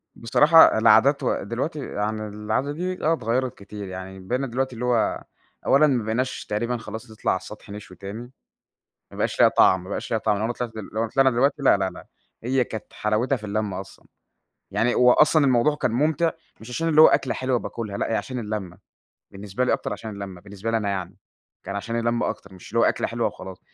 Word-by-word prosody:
بصراحة 150 +5 +6
العادات 115 +5 +5
و - - 0
دلوقتي 145 +7 -3
يعني 110 -3 -3
العادة 105 +7 -2
دي 180 +4 -4
آه 160 - +4
اتغيّرت 125 -2 -1
كتير، 100 0 -8
يعني 95 +1 -8
بقينا 125 +8 -2
دلوقتي 130 +2 -2
اللي 125 - -4
هو، 120 -2 +1 0.4
أولًا 145 +3 +5
ما 130 -5 +1
بقيناش 120 +4 -2
تقريبًا 120 +3 -2
خلاص 115 0 -8
نطلع 110 - -1
على 95 - 0
السطح 105 +2 -12
نشوي 100 -3 -10
تاني 110 +6 -8 0.8
ما - - -12
بقاش - - -2
لها - - +8
طعم، 95 -1 +4
ما 95 - -10
بقاش - - -4
لها 115 - +1
طعم، 105 -2 0
لو 105 - -2
أنا 120 - 0
طلعت 120 -1 -4
دلو 110 -3 -7
لو 110 +2 -1
طلعنا 135 +4 +3
دلوقتي 140 +4 +1
لا، 135 - +5
لا، 95 -1 -1
لا، - - -12 0.4
هي 125 +2 +1
كانت 110 -3 -8
حلاوتها 110 +6 0
في 110 - -11
اللمة 100 -2 -2
أصلًا، 95 - -13 0.7
يعني 120 +2 +1
هو 125 0 +6
أصلًا 150 +1 +5
الموضوع 130 +3 +3
كان 125 - -1
مُمتع 155 +6 +1 0.3
مش 110 - -11
عشان 165 +7 -2
اللي 155 -1 +6
هو - - +10
أكلة 130 - +2
حلوة 130 -1 0
باكلها 105 -4 -5
لأ، - - -2
هي - - +1
عشان 130 +2 -3
اللمّة، 105 -5 -5 0.5
بالنسبة 100 +4 -3
لي 125 - +1
أكتر - - -2
عشان 110 +2 -6
اللمّة، 100 -3 -8
بالنسبة 100 +3 -6
لي 115 - +1
أنا 105 -2 -1
يعني، 95 -2 -4 0.5
كان 100 - -5
عشان 115 +3 -3
اللمّة 120 0 0
أكتر 100 -1 -10
مش 90 - -13
اللي 115 - 0
هو - - +5
أكلة - - +1
حلوة - - -1
وخلاص. 95 -1 -7
115 Hz, 215 wpm, -24 LUFS, 105-130 Hz, 0.8 s, هو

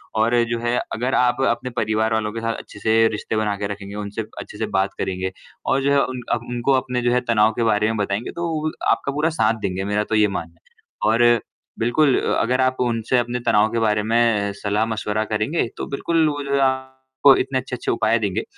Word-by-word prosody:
और 115 +2 +3
जो 120 -1 -1
है 120 +1 0 0.2
अगर 125 +3 -1
आप 125 +1 +2
अपने 120 +2 -2
परिवार 110 +1 +1
वालों 105 -1 0
के 115 - -4
साथ 115 0 -1
अच्छे 105 - -12
से 115 +1 +3
रिश्ते 110 +1 -4
बना 105 -1 0
के 100 0 -2
रखेंगे, 100 0 -7
उनसे 105 +1 -4 0.2
अच्छे - - -9
से 110 - -1
बात 95 0 +1
करेंगे 95 0 -2 0.3
और 135 0 +1
जो 140 - +2
है 140 0 +4
उन 130 -1 -5
अ, - - +2
उनको 120 +3 0
अपने 125 -1 -3
जो 120 0 +1
है 125 - +2
तनाव 110 0 +4
के 120 - -1
बारे 105 -1 +2
में 110 0 -1
बताएँगे 100 +2 -2
तो 170 0 -3
वो 155 -1 -2
भी - - -1 0.2
आपका 140 - 0
पूरा 150 +3 +1
साथ 110 +1 +4
देंगे, 95 -1 -2
मेरा 105 +1 0
तो 110 - -2
ये 105 -1 +4
मानना 85 -3 -6
है 110 - -3 0.2
और 120 -2 +4 0.4
बिल्कुल 130 +4 +3
अ - - 0
अगर 130 +3 +1
आप 130 0 +2
उनसे 120 0 0
अपने 120 0 -2
तनाव 105 +1 +4
के 115 - 0
बारे 105 -2 +1
में 110 -2 +2
सलाह-मशवरा 110 0 0
करेंगे, 110 +8 -1
तो - - -3
बिल्कुल 160 +3 +1
वो 145 -1 -4
जो 140 0 -3
है 140 - +2
आपको 130 0 +2
इतने 130 -1 0
अच्छे-अच्छे 125 -1 -4
उपाय 115 0 +2
देंगे 105 0 -1
115 Hz, 225 wpm, -21 LUFS, 105-130 Hz, 0.4 s, है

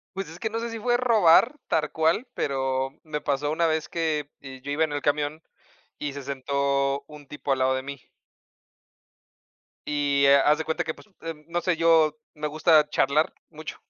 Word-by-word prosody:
Pues, 195 -3 -4
es 165 +2 -11
que 220 - -2
no 225 +1 -3
sé 235 0 -4
si 230 - -5
fue 240 +2 +2
robar, 230 - +4
tar 150 -2 0
cual, 165 +10 +1
pero, 135 -1 -1
me 150 -2 -4
pasó 145 +1 -1
una 165 +2 +1
vez 160 -1 -1
que, 155 -3 -2
yo 135 0 -9
iba 155 +3 +2
en 150 - -4
el 145 - -3
camión 150 +2 -1 0.6
y 145 -2 -3
se 140 - -7
sentó 140 +1 -1
un 150 -2 -13
tipo 145 0 -6
al 135 - 0
lado 130 0 +3
de 130 - -2
mí 140 0 -8 1.9
Y, 145 -1 +1
eh, 140 0 +7
haz 150 +1 +4
de 160 - -3
cuenta 160 - -1
que, 160 - -4
pues, - - -17
eh, 165 0 -5
no 175 +1 -1
sé, 175 -1 0
yo 160 -2 +4 0.2
me 150 0 -4
gusta 155 0 +4
charlar 150 +1 +2 0.2
mucho. 155 0 -8
150 Hz, 195 wpm, -25 LUFS, 140-165 Hz, 1.9 s, eh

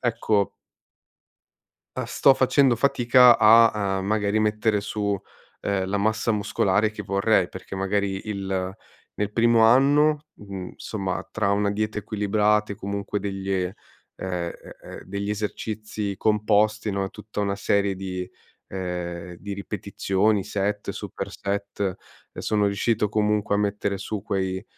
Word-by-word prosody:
ecco 110 -4 +1 1.5
uhm, - - -2
sto 135 - +4
facendo 130 -1 +3
fatica 125 -1 +5
a, 110 -3 +5
uhm, 95 - -4
magari 105 0 +1
mettere 105 0 +1
su, 100 -1 -2 0.4
ehm, 95 -2 -1
la 100 - -1
massa 110 +2 +1
muscolare 105 0 +1
che 105 - -6
vorrei 100 -1 +2
perché 95 +1 -9
magari 95 +1 -1
il 95 -2 -3 0.4
nel 105 0 -2
primo 115 0 +4
anno, 145 +5 +4
mhmm, 100 -3 -7
insomma 95 -4 -4
tra 105 -2 0
una 100 0 +2
dieta 105 +1 -2
equilibrata 105 0 +1
e - - -8
comunque 100 0 -3
degli 95 -1 -4
ehm, 90 -1 0 0.5
e 90 -2 -3 0.3
e - - -9
degli 100 +2 -4
esercizi 105 0 -4
composti, 105 0 +2
no, 100 0 -1
e - - -3
tutta 105 0 -7
una 100 -1 -1
serie 100 -1 +1
di 90 -1 -5 0.4
ehm, 90 -2 -5
di 100 +4 -7
ripetizioni, 100 0 -1
set, 100 +1 -2
super - - -6
set, 100 -1 -3 0.4
e - - -7
sono 105 -1 +1
riuscito 105 +2 +1
comunque 105 -1 +1
a - - 0
mettere 100 -1 -1
su 105 0 -4
quei 95 0 -2
100 Hz, 140 wpm, -24 LUFS, 95-110 Hz, 1.5 s, fatica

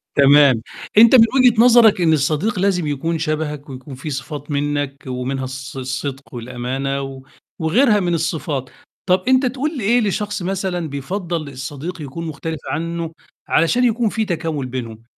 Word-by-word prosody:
تمام، 140 -3 +6 0.4
أنت 230 +3 +8
من 230 -2 +8
وجهة 245 -3 +5
نظرك 235 -5 +6
إن 160 -2 +4
الصديق 155 +8 0
لازم 180 -4 +1
يكون 160 +3 -2
شبهك، 150 -2 -3
ويكون 130 +1 -9
فيه 130 +4 -7
صفات 145 +2 -6
منّك 145 -1 -2
ومنها 130 +1 -3
الص 130 0 -7
الصدق 130 +1 -5
والأمانة، 125 +3 -3
و 135 -1 -7 0.4
وغيرها 210 - +3
من 175 -2 0
الصفات، 155 -5 -2 0.4
طَب 185 0 +2
أنت 260 +1 +4
تقول 275 +4 -2
إيه 235 +3 +2
لشخص 205 -1 -2
مثلًا 180 -3 -2
بيفضَّل 165 +2 -4
الصديق 145 +6 -6
يكون 155 +4 -6
مختلف 160 +1 -5
عنه 165 +1 -3 0.4
علشان 240 +10 +2
يكون 235 -1 +2
فيه 220 +1 -1
تكامُل 160 -6 -2
بينهم، 115 -3 -6
155 Hz, 150 wpm, -19 LUFS, 135-195 Hz, 0.4 s, أنت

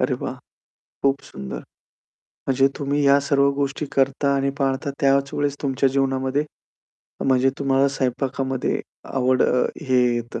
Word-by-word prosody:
अरे, - - +1
वाह! - - -3 0.7
खूप 140 0 +2
सुंदर. 65 0 -7 0.9
म्हणजे 135 0 +3
तुम्ही 145 0 -1
ह्या 140 0 +6
सर्व 140 0 +2
गोष्टी 140 +1 -2
करता 140 +1 +2
आणि 140 0 +1
पाळता 135 +1 0
त्याच 140 0 +2
वेळेस 145 -1 -1
तुमच्या 135 -1 +1
जीवनामध्ये, 135 +1 0 0.8
म्हणजे 130 0 +3
तुम्हाला 135 0 +2
स्वयंपाकामध्ये 130 0 -1 0.3
आवड 130 -1 +2 0.5
हे 130 - +3 0.2
येतं. 120 -1 -4
135 Hz, 125 wpm, -22 LUFS, 130-140 Hz, 0.9 s, ह्या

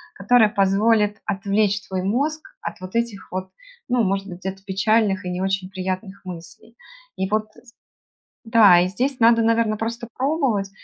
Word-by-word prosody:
которое 220 +2 +4
позволит 205 +1 +2
отвлечь 200 +1 0
твой 190 -1 -3
мозг 285 +10 -1 0.2
от - - -6
вот 185 +4 -9
этих 235 -4 -3
вот, 185 0 -5 0.4
ну, 245 -1 +2
может 195 0 -1
быть, 180 -2 -9
где-то 190 +1 -6
печальных 200 0 +1
и - - -3
не 180 - -3
очень 190 -1 -1
приятных 190 +1 -5
мыслей. 180 +6 -11 0.4
И 190 - -2
вот 215 +1 0
з 235 -1 -19 0.7
Да. 215 -6 +6
И 180 - +1
здесь 255 +7 -2
надо, 230 0 +5
наверно, 225 -1 +2
просто 230 +2 -4
пробовать, 260 -8 0
205 Hz, 160 wpm, -22 LUFS, 190-230 Hz, 0.7 s, Да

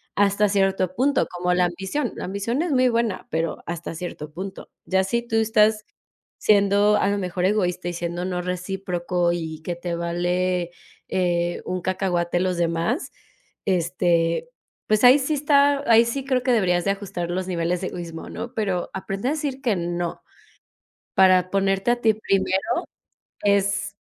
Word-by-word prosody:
hasta 205 +1 +3
cierto 195 -2 +1
punto, 280 +3 +2
como 180 0 -1
la 180 0 +3
ambición. 190 +11 -2
La - - -5
ambición 200 +8 -2
es 340 -1 -1
muy 255 -2 +4
buena, 230 -4 -1
pero 165 0 -2
hasta 170 -1 -5
cierto 155 -3 -6
punto. 190 +3 -7 0.2
Ya 190 0 +2
si 235 +5 0
tú 225 -1 -1
estás 215 -1 +3 0.5
siendo 205 0 +4
a 200 - +1
lo 205 - 0
mejor 180 -1 -2
egoísta 185 -3 0
y - - -4
siendo 175 +1 -3
no 180 -1 -2
recíproco 180 -1 -2
y 160 -2 -5
que 175 +1 -3
te 175 0 -4
vale, 175 +1 -1 0.4
eh, 175 -2 0
un 185 0 -3
cacahuate 175 -2 0
los 185 -1 0
demás, 170 - -1 0.5
este, 175 - +1 0.4
pues 215 +1 +2
ahí 255 +3 +8
sí 285 +3 0
está 285 -1 +3
ahí 230 0 +8
sí, 265 +3 -3
creo 260 -2 +1
que 255 - +2
deberías 180 -6 +2
de 200 - +3
ajustar 195 -4 -4
los 185 +1 -2
niveles 175 -1 -1
de 185 - -2
egoísmo, 170 -2 -7
¿no? 240 - -6
Pero 195 -5 -1
aprende 195 +4 -4
a - - +1
decir 290 -4 -3
que 235 -6 +1
no, 175 -1 -3 0.9
para 185 -1 +5
ponerte 195 +2 +1
a 240 - -2
ti 220 -2 +3
primero, 190 -3 +1 0.8
es 200 0 +1
190 Hz, 165 wpm, -23 LUFS, 175-215 Hz, 0.9 s, ahí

